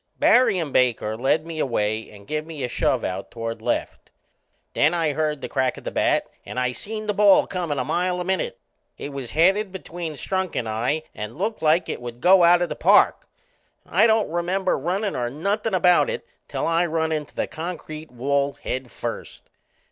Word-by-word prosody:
Barry 245 -6 +4
and 160 -6 -3
Baker 115 -4 +2
led 135 +7 +1
me 165 -1 -6
away 110 -5 -1
and 100 -1 -14
give 155 +6 -2
me 155 -3 -7
a - - 0
shove - - 0
out 95 +1 -4
toward 115 -1 -5
left. - - -3 0.6
Then 155 +4 +3
I 160 -3 +1
heard 150 -1 -1
the - - -4
crack 130 -2 0
o' - - -9
the - - -5
bat - - +2 0.2
and 125 - -5
I 125 -1 +1
seen 215 - -6
the 210 - 0
ball 205 -1 +5
comin' 175 -6 -3
a 130 - -1
mile 180 +5 0
a - - -1
minute. 190 -1 -1 0.4
It 145 - -6
was 135 -4 -6
headed 190 +5 +3
between 175 -3 -6
Strunk 185 +4 -3
and 115 - -1
I 120 +8 -1
and 105 +4 -7
looked 215 +5 -2
like 160 +2 +3
it - - -4
would 120 0 -7
go 180 +5 +6
out 175 +1 +6
o' - - +2
the - - -5
park. - - +4 0.6
I 225 - +4
don't 220 -6 +2
remember 180 +2 0
runnin' 190 +8 -2
or 120 -1 -1
nothin' 200 - -1
about 180 - +4
it 485 -1 -4 0.2
till - - -3
I 165 +1 +2
run 160 0 -1
into 150 -2 -3
the - - 0
concrete 160 -2 -7
wall 140 +3 0
head 130 -1 -5
first. - - -7
160 Hz, 200 wpm, -23 LUFS, 130-180 Hz, 0.6 s, go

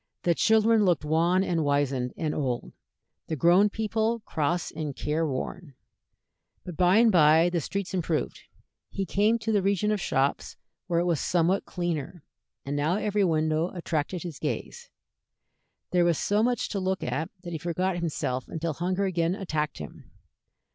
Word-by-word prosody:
The 175 - +3
children 220 +3 +4
looked 175 -6 +2
wan 170 +5 +2
and 170 -4 0
wizened 140 -3 0
and 155 -2 -1
old, 125 -5 -3 0.5
the 160 - -2
grown 175 +8 +4
people 220 +2 -1
cross 170 -2 -2
and 150 -4 -5
care 160 +2 -1
worn; 145 +2 -5 0.9
but 180 - -7
by 180 +3 +4
and 230 0 +5
by 165 0 +5
the 170 -2 0
streets 195 +5 -4
improved; 170 -4 -1 0.5
he 195 - -3
came 210 +6 +2
to 220 -1 -3
the 205 -2 +3
region 200 +2 +1
of 210 -3 -1
shops, 135 -2 -1 0.3
where 170 -2 +1
it 175 - +1
was 170 -4 +1
somewhat 180 +2 +1
cleaner, 175 -3 -4 0.4
and 140 +1 -3
now 150 +5 +1
every 210 -1 0
window 160 -1 +1
attracted 170 0 -2
his 170 -6 -7
gaze. - - -4 1.0
There 180 -1 +3
was 170 -3 +2
so 205 +1 +1
much 240 0 0
to 200 - -2
look 190 0 -1
at 135 +6 -2
that 175 -1 -6
he 160 - -3
forgot 175 +3 -1
himself 145 -6 -2
until 165 0 -3
hunger 180 +5 -1
again 175 -1 0
attacked 155 -7 -3
him. 75 - -10
175 Hz, 165 wpm, -27 LUFS, 155-195 Hz, 1.0 s, and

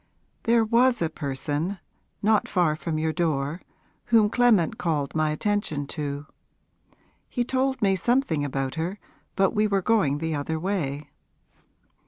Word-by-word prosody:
'There 230 -1 +4
was 240 +2 +3
a 165 -2 -1
person, 145 +6 -3 0.5
not 215 0 +3
far 170 -4 +2
from 155 0 -3
your 160 0 0
door, 155 -1 -1 0.4
whom 215 -2 +4
Clement 230 -10 +3
called 155 -5 -1
my 155 -1 +1
attention 155 -3 -1
to. 145 0 -4 1.0
He 245 - 0
told 265 +1 0
me 195 -1 +4
something 215 - +1
about 135 -1 -2
her 180 +5 -3 0.4
but 195 -1 +3
we 210 0 +2
were 195 -2 0
going 175 -11 +2
the 160 +1 -2
other 155 +2 -2
way.' 150 -6 -3
170 Hz, 140 wpm, -25 LUFS, 150-210 Hz, 1.0 s, There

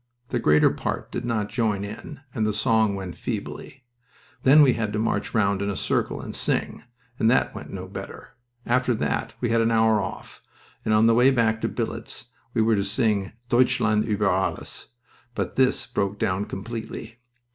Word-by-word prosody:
The 120 - 0
greater 75 -7 +4
part - - -4
did - - -4
not 110 -3 -1
join 105 -4 0
in, 110 +8 -8
and 110 - -1
the 105 0 +1
song 110 -1 +2
went 95 -4 -6
feebly. 135 - -6 0.6
Then 145 +3 +7
we 130 -3 +5
had 110 -2 -2
to - - -1
march 110 +1 -1
round 100 -3 +2
in 100 - -1
a 100 - -2
circle - - -1
and - - -7
sing, - - -1 0.4
and 110 - +4
that 125 - +2
went - - -8
no - - -6
better. - - -9 0.3
After 125 0 +2
that - - -2
we 120 - 0
had 115 0 +3
an 115 - +2
hour 110 -2 +3
off, 90 - -7 0.4
and 110 - -1
on 110 +1 +5
the 115 - +5
way 125 +3 +6
back 115 -4 +2
to - - +1
billets 120 - -5 0.2
we 115 - +3
were 110 0 +3
to 100 - +1
sing 105 -1 0 0.2
'Deutschland 120 -3 +3
uber 105 -2 +1
Alles,' 95 0 -1 0.5
but - - -3
this 130 -1 +2
broke 100 +1 -2
down 95 +1 0
completely. 110 +2 -7
110 Hz, 185 wpm, -25 LUFS, 100-120 Hz, 0.6 s, Then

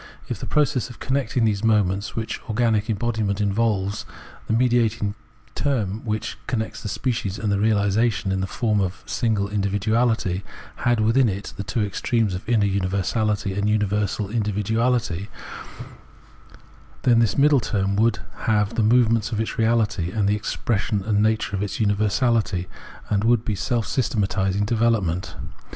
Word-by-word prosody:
If - - -3
in - - -4
the - - -10
process 150 -5 +1
of 120 - -11
connecting 130 -3 0
the 110 -2 +2
moments 105 -2 +1
which 115 -1 -3
organic 110 -1 +1
embodiment 110 -2 -1
involves, 100 -1 0 0.4
the - - 0
mediating 115 -3 +2 0.4
term, 110 -7 -1
which 110 +1 -3
contains 110 -3 -3
the 105 - -4
species 110 -5 -2
and 105 -2 -1
its 100 - 0
reahsation 105 0 +2
in 95 0 0
the 95 - -1
form 105 -1 0
of 95 0 -3
a - - -17
single 110 -4 0
individuality, 105 0 0 0.4
had 120 -2 +1
with 115 +3 +2
in 130 -4 +5
it 100 +1 -5
the 100 - -5
two 110 +2 -1
extremes 110 0 0
of 90 +5 -6
inner 110 -4 +3
universahty 100 +1 0
and 100 +1 0
universal 105 -1 0
individuahty, 105 -2 0 1.8
then 120 -2 +5
this 115 -3 +2
middle 145 0 +5
term 100 -3 -1
would 115 +2 +2 0.3
have, 105 -2 +3
in - - -9
the - - +3
movement 115 0 +3
of 110 - -2
its 110 - -1
reahty, 110 -4 +1
the 100 +1 +3
expression 105 -1 -1
and 105 0 0
the - - +3
nature 110 -2 -2
of 100 +1 -3
universality, 105 -2 +1 0.4
and 100 0 +2
would 115 0 +3
be 110 - -1
seK 115 +5 -1
systematising 100 -5 0
development. 110 -6 0
105 Hz, 155 wpm, -23 LUFS, 100-115 Hz, 1.8 s, in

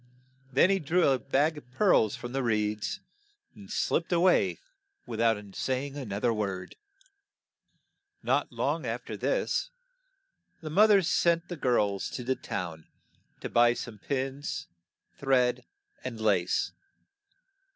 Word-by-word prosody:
Then 140 +8 +5
he 195 - +2
drew 175 +3 +2
a 135 -1 +2
bag 145 +5 +1
of 125 - -23
pearls 130 - +3
from 120 - -7
the 135 +1 -1
reeds, 105 -3 -1 0.5
and 200 -1 -14
slipped 175 -5 0
a 175 - +3
way 180 +1 +3 0.5
with - - -4
out 115 -2 +4 0.2
say 130 +1 -1
ing 140 -1 -8
an 130 -8 -6
oth 100 +1 -4
er 120 -2 +3
word. 100 -4 -3 1.5
Not - - +1
long - - -1
af - - -4
ter - - -5
this, - - 0 0.9
the 155 -3 -7
moth 210 +7 +6
er 200 -2 +6
sent 170 0 +2
the 175 - -4
girls 105 - +1
to 125 - -4
the 130 +2 0
town 85 -10 -5 0.5
to - - -3
buy 120 0 +4
some 115 -4 -7
pins, 135 - -3 0.5
thread, 130 -3 +2 0.4
and 115 -3 -5
lace. 100 -5 +1
130 Hz, 145 wpm, -29 LUFS, 110-160 Hz, 1.5 s, moth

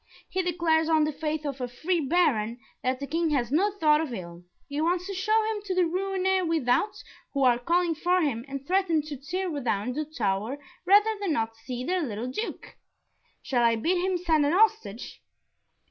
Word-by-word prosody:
He 375 - 0
declares 330 -2 +1
on 315 -1 +4
the 305 - 0
faith 305 +1 -3
of 275 -2 -4
a 250 - -1
free 330 +9 -1
Baron, 270 -8 +1 0.2
that 255 0 -1
the 280 - -4
King 330 +3 0
has 255 -5 0
no 370 +8 +3
thought 310 -6 +3
of 315 -5 -4
ill 175 -5 -7 0.2
he 285 +1 -3
wants 350 +2 +1
to 395 - -5
show 430 +4 +2
him 435 -1 -2
to 375 -2 -2
the 365 - +4
Rouennais 380 +2 0
without, 325 - +1 0.3
who 275 - +2
are 245 -2 +4
calling 340 +6 +1
for 355 +4 +1
him, 275 -9 0
and 275 0 -6
threaten 350 -3 +2
to 300 -1 -6
tear 355 +8 -3
down 235 -1 -1
the 305 +3 -2
tower 220 -3 -2 0.3
rather 415 +3 +5
than 380 -6 0
not 225 -4 -1
see 240 +2 -6
their 365 +5 0
little 235 -4 -3
Duke. 435 - -6 0.7
Shall 255 -4 0
I 230 -1 +4
bid 350 +10 0
him 375 -1 +1
send 325 -4 +2
a 285 - +2
hostage?" 400 - +1
310 Hz, 195 wpm, -27 LUFS, 255-365 Hz, 0.7 s, rather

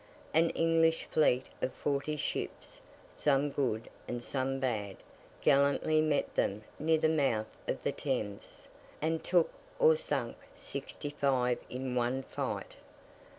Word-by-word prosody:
An 165 +1 +5
English 165 0 +3
fleet 130 -4 +3 0.2
of 130 - 0
forty 145 +2 -1
ships, - - -4 0.3
some 145 0 +2
good 120 -6 -1 0.2
and 120 - -3
some 135 +2 -2
bad, 105 -7 -2 0.4
gallantly 140 +3 +4
met 155 -2 +1
them 100 +2 0 0.2
near 160 +1 +3
the 155 - +3
mouth 135 -9 +1
of - - -2
the - - +1
Thames, 110 -8 -4 0.3
and 160 +1 0
took 175 -2 +3 0.3
or 475 -1 +6
sunk - - -2 0.2
sixty 145 - -6
five 130 -4 +1
in 130 0 -3
one 125 +2 0
fight. - - -4
140 Hz, 130 wpm, -32 LUFS, 125-155 Hz, 0.4 s, or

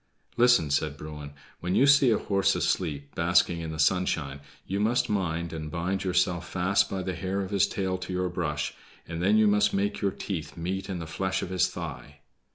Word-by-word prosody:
"Listen," 120 -11 +4
said 75 0 0
Bruin. 75 -1 -8 0.3
"When 90 +1 -2
you 135 - +5
see 140 -2 +6
a 110 - +3
horse 100 -1 +1
asleep, 70 -5 -1
basking 85 +1 +2
in 80 -1 -5
the 80 - -6
sunshine, 80 -4 +1 0.3
you 100 +2 -2
must 115 +3 +1
mind 85 -4 -1
and 80 -1 -5
bind 90 +4 -2
yourself 90 -2 0
fast 95 +2 +2
by 95 -1 -3
the 95 - -3
hair 95 +3 -2
of 95 0 -5
his 100 -1 +3
tail 95 -3 -2
to 95 0 -6
your 90 0 -1
brush, 75 -4 -2 0.3
and 85 0 -5
then 100 +4 +4
you 110 - +5
must 105 0 +3
make 100 +1 -1
your 100 - +2
teeth 85 -5 -5
meet 95 +4 -3
in 95 - -3
the 85 - -5
flesh 95 +4 -2
of 90 - -5
his 90 -1 +2
thigh." 75 +1 -8
90 Hz, 205 wpm, -27 LUFS, 80-100 Hz, 0.3 s, see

